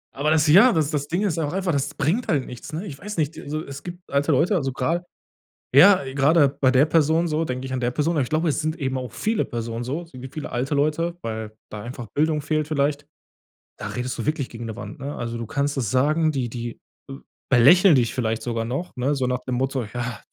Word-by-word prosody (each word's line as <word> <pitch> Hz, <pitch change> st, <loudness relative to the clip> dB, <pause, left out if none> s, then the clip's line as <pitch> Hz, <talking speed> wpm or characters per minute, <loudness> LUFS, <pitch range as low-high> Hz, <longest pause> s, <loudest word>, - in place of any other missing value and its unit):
Aber 145 Hz, +3 st, 0 dB
das, 155 Hz, -1 st, +4 dB
ja 200 Hz, +12 st, +7 dB
das 155 Hz, -2 st, +1 dB
das 145 Hz, -1 st, -2 dB
Ding 175 Hz, +6 st, -1 dB
ist 170 Hz, -5 st, 0 dB
auch 150 Hz, +1 st, -2 dB
einfach, 190 Hz, -2 st, 0 dB
das 140 Hz, -2 st, -1 dB
bringt 205 Hz, -, 0 dB
halt 140 Hz, -5 st, +1 dB
nichts, 125 Hz, +4 st, -9 dB
ne? 165 Hz, +7 st, -4 dB
Ich 140 Hz, -7 st, -8 dB
weiß 210 Hz, -2 st, -7 dB
nicht, 155 Hz, 0 st, 0 dB
d -, -, -8 dB
also, 155 Hz, +2 st, -4 dB
es 140 Hz, 0 st, -8 dB
gibt 175 Hz, 0 st, -10 dB
alte 145 Hz, +2 st, +2 dB
Leute, 165 Hz, +9 st, +3 dB
also 135 Hz, -6 st, 0 dB
grade 165 Hz, +7 st, -1 dB, 0.7 s
ja, 180 Hz, +2 st, +8 dB
gerade 145 Hz, +1 st, +4 dB
bei 140 Hz, -1 st, +1 dB
der 130 Hz, +3 st, +5 dB
Person 160 Hz, +2 st, +2 dB
so, 160 Hz, +1 st, 0 dB
denke 130 Hz, 0 st, -4 dB
ich 130 Hz, -, -5 dB
an 130 Hz, -, -1 dB
der 120 Hz, -, 0 dB
Person 155 Hz, +5 st, 0 dB
aber 145 Hz, -, +2 dB
ich 125 Hz, -, -2 dB
glaube, 160 Hz, +2 st, +1 dB
es 150 Hz, -, 0 dB
sind 155 Hz, +1 st, -1 dB
eben 130 Hz, -3 st, -2 dB
auch 125 Hz, -3 st, -5 dB
viele 220 Hz, -, 0 dB
Personen 115 Hz, 0 st, -4 dB
so, 140 Hz, +8 st, -3 dB
es 165 Hz, -, -18 dB
gibt 130 Hz, +1 st, -9 dB
viele 155 Hz, -, -6 dB
alte 130 Hz, +4 st, -1 dB
Leute, 160 Hz, +4 st, 0 dB
weil 110 Hz, -1 st, -4 dB, 0.2 s
da 105 Hz, -, -7 dB
einfach 120 Hz, 0 st, -7 dB
Bildung 155 Hz, 0 st, +1 dB
fehlt 155 Hz, -1 st, 0 dB
vielleicht. 145 Hz, -1 st, 0 dB, 0.7 s
Da -, -, -4 dB
redest 125 Hz, +1 st, -4 dB
du 115 Hz, -, -3 dB
wirklich 150 Hz, -4 st, -1 dB
gegen 115 Hz, 0 st, -8 dB
'ne 110 Hz, -, -5 dB
Wand, 130 Hz, +5 st, -8 dB
ne? 140 Hz, +2 st, -5 dB
Also, 115 Hz, -1 st, -4 dB
du 115 Hz, -, -4 dB
kannst 140 Hz, +3 st, -1 dB
es 120 Hz, -6 st, -1 dB
sagen, 155 Hz, +5 st, +2 dB
die 130 Hz, -4 st, -2 dB
die 120 Hz, 0 st, -6 dB, 0.7 s
belächeln 155 Hz, +8 st, +7 dB
dich 120 Hz, -3 st, +2 dB
vielleicht 115 Hz, -3 st, -1 dB
sogar 115 Hz, -2 st, -2 dB
noch, 135 Hz, +9 st, -4 dB
ne, 135 Hz, +4 st, +1 dB
so 130 Hz, -, 0 dB
nach 125 Hz, -1 st, 0 dB
dem 125 Hz, -, -1 dB
Motto: 130 Hz, 0 st, -1 dB
„Ja, 120 Hz, -2 st, -4 dB
140 Hz, 245 wpm, -23 LUFS, 125-160 Hz, 0.7 s, ja